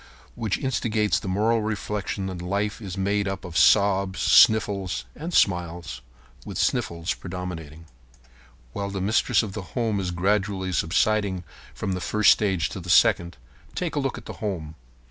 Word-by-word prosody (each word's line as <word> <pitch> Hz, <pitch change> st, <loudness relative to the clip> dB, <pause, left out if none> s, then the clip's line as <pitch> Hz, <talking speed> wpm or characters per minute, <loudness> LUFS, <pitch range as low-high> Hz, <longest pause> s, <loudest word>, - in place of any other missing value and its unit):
Which 110 Hz, -4 st, -2 dB
instigates 110 Hz, -5 st, 0 dB
the -, -, -8 dB
moral 110 Hz, +4 st, +1 dB
reflection 105 Hz, -2 st, -3 dB
that 95 Hz, -2 st, -5 dB
life 100 Hz, +5 st, -2 dB
is 100 Hz, -2 st, -6 dB
made 100 Hz, +1 st, 0 dB
up 95 Hz, -1 st, -4 dB
of 85 Hz, -2 st, -9 dB
sobs, 100 Hz, -1 st, +4 dB
sniffles, 100 Hz, -4 st, +4 dB
and 165 Hz, +4 st, -6 dB
smiles, 85 Hz, -, 0 dB, 0.4 s
with -, -, -7 dB
sniffles 85 Hz, +1 st, 0 dB
predominating. 85 Hz, -4 st, -7 dB, 0.9 s
While 100 Hz, 0 st, -3 dB
the 100 Hz, -1 st, -4 dB
mistress 105 Hz, +4 st, +2 dB
of 100 Hz, -3 st, -6 dB
the 105 Hz, -, -4 dB, 0.2 s
home 110 Hz, -4 st, 0 dB
is 95 Hz, -2 st, -2 dB
gradually 95 Hz, +1 st, 0 dB
subsiding 95 Hz, +2 st, +1 dB, 0.3 s
from 95 Hz, -, -3 dB
the 90 Hz, -1 st, -3 dB
first 105 Hz, +2 st, +4 dB
stage 95 Hz, -6 st, +1 dB
to -, -, -6 dB
the -, -, -9 dB
second, 85 Hz, -3 st, +4 dB, 0.4 s
take 175 Hz, -3 st, -2 dB
a -, -, +1 dB
look 135 Hz, -2 st, -2 dB
at -, -, -10 dB
the -, -, -7 dB
home. 85 Hz, -8 st, -4 dB
95 Hz, 160 wpm, -25 LUFS, 90-105 Hz, 0.9 s, sobs